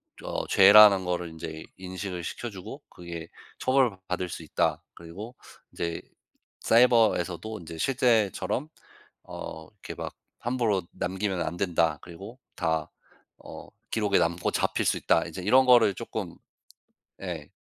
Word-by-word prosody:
좀 -, -, -11 dB
어 -, -, -3 dB
죄라는 100 Hz, -1 st, +8 dB
거를 90 Hz, -1 st, -2 dB
인제 80 Hz, -1 st, -8 dB
인식을 95 Hz, -1 st, -6 dB
시켜 120 Hz, +8 st, -5 dB
주고 95 Hz, -4 st, -9 dB
그게 85 Hz, -1 st, -9 dB, 0.3 s
'처벌받을 95 Hz, -9 st, 0 dB
수 85 Hz, -, -6 dB
있다.' 80 Hz, -, 0 dB
그리고 100 Hz, +9 st, -10 dB, 0.4 s
인제 85 Hz, -1 st, -3 dB, 0.6 s
'사이버에서도 110 Hz, -4 st, +3 dB
인제 80 Hz, -1 st, -9 dB
실제처럼 115 Hz, -, +1 dB, 0.6 s
어 80 Hz, 0 st, -8 dB
이렇게 105 Hz, -, -10 dB
막 -, -, -6 dB, 0.2 s
함부로 115 Hz, -6 st, 0 dB
남기면 95 Hz, -1 st, -2 dB
안 85 Hz, +1 st, -4 dB
된다.' 85 Hz, -5 st, +1 dB
그리고 95 Hz, +8 st, -11 dB, 0.2 s
'다 80 Hz, -1 st, -1 dB, 0.5 s
어 -, -, -10 dB, 0.2 s
기록에 105 Hz, -3 st, +2 dB
남고 85 Hz, 0 st, 0 dB
잡힐 -, -, 0 dB
수 -, -, +2 dB
있다.' 80 Hz, -, +2 dB
이제 85 Hz, +3 st, -7 dB
이런 130 Hz, +7 st, +5 dB
거를 120 Hz, -5 st, +6 dB
쪼끔 -, -, -6 dB, 0.9 s
예 85 Hz, -6 st, -6 dB
95 Hz, 270 characters per minute, -27 LUFS, 85-110 Hz, 0.9 s, 죄라는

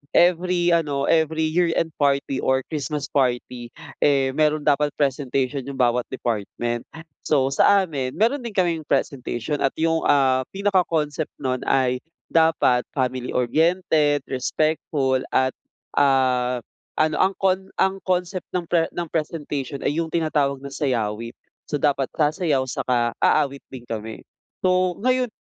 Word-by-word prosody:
every 175 Hz, 0 st, +3 dB
ano 145 Hz, -5 st, +1 dB
every 160 Hz, 0 st, +2 dB
year 170 Hz, 0 st, +2 dB
end 160 Hz, -, 0 dB
party 140 Hz, -2 st, +1 dB
or 130 Hz, 0 st, +1 dB
Christmas 150 Hz, -1 st, -3 dB
party 125 Hz, -2 st, -1 dB, 0.3 s
eh, 135 Hz, -2 st, +3 dB
mayro'n 150 Hz, +1 st, +1 dB
dapat 145 Hz, 0 st, +2 dB
presentation 135 Hz, -1 st, -1 dB
'yong 140 Hz, -, -5 dB
bawat 125 Hz, -1 st, +1 dB
department 120 Hz, 0 st, -3 dB
ah. 160 Hz, -, -9 dB, 0.2 s
So 135 Hz, -3 st, +2 dB
sa 195 Hz, +8 st, +4 dB
amin 135 Hz, -7 st, -4 dB
meron 230 Hz, +9 st, +2 dB
din 235 Hz, -5 st, -7 dB
kaming 170 Hz, -4 st, 0 dB
presentation 130 Hz, +1 st, -1 dB
at 135 Hz, -, 0 dB
yung, 165 Hz, 0 st, +1 dB
ah, 130 Hz, -2 st, +3 dB
pinaka 200 Hz, -1 st, +2 dB
concept 150 Hz, -1 st, -2 dB
nun 130 Hz, -1 st, 0 dB
ay 125 Hz, -1 st, +2 dB, 0.3 s
dapat 160 Hz, -7 st, +3 dB
family 130 Hz, -2 st, -2 dB
oriented, 150 Hz, +2 st, +2 dB
respectful 135 Hz, 0 st, 0 dB, 0.2 s
at, 130 Hz, 0 st, +3 dB, 0.5 s
ah, 125 Hz, -3 st, +2 dB, 0.3 s
ano 155 Hz, 0 st, +1 dB
ang 190 Hz, +1 st, +2 dB
con 190 Hz, 0 st, 0 dB
ang 190 Hz, 0 st, +1 dB
concept 180 Hz, 0 st, -1 dB
ng 180 Hz, -, 0 dB
pre 165 Hz, -2 st, +3 dB
ng 175 Hz, -1 st, -3 dB
presentation 150 Hz, -3 st, -3 dB
ay -, -, +1 dB
yung 165 Hz, -, -1 dB
tinatawag 150 Hz, -4 st, 0 dB
na 140 Hz, -, -7 dB
sayawit. 115 Hz, -5 st, -2 dB, 0.3 s
So -, -, -2 dB
dapat 140 Hz, -2 st, +1 dB
sasayaw 150 Hz, -2 st, +1 dB
tsaka 125 Hz, -2 st, 0 dB
aawit 140 Hz, -2 st, +2 dB
din 130 Hz, -2 st, -10 dB
kami. 110 Hz, -2 st, -6 dB, 0.4 s
So 185 Hz, -1 st, +2 dB
ngayon 255 Hz, 0 st, +2 dB
145 Hz, 140 wpm, -23 LUFS, 130-165 Hz, 0.5 s, sa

